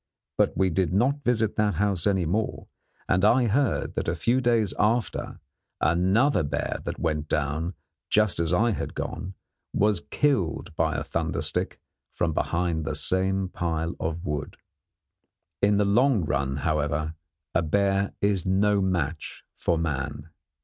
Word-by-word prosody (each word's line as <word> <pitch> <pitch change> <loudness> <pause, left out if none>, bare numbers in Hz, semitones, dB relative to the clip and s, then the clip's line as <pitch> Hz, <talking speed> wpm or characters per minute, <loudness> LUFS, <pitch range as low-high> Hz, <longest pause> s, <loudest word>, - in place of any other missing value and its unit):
But - - +1
we 95 -1 +2
did 90 0 +1
not 130 +9 +1
visit 115 -4 +1
that 105 -1 +2
house 100 -4 0
any 95 -3 +2
more, 105 +7 -1 0.4
and 95 - +2
I 120 +4 +5
heard 130 +4 +1
that - - -3
a 80 - 0
few 120 +9 +1
days 115 -5 +2
after 115 +2 0 0.4
another 95 - +3
bear 75 - -2
that - - -4
went 75 -1 -2
down 80 +5 -1 0.3
just 105 -4 +2
as 85 -1 0
I 115 +6 +3
had - - -4
gone 95 +1 -5 0.4
was 105 -3 +2
killed 95 - 0
by 80 -2 +1
a 70 - -1
thunder - - -2
stick - - -2 0.3
from 85 -2 0
behind 85 0 0
the - - -3
same 95 +1 +2
pile 85 -1 -2
of 85 +3 -3
wood. 75 -2 -4 1.0
In 100 0 +4
the 105 - +3
long 110 - +3
run, 70 -2 -1
however, 75 +1 -1 0.4
a 85 - +3
bear 100 +4 +1
is 100 -3 +1
no 100 +2 +2
match 85 -5 -2
for 85 - 0
man. 75 -1 -3
95 Hz, 150 wpm, -26 LUFS, 80-105 Hz, 1.0 s, I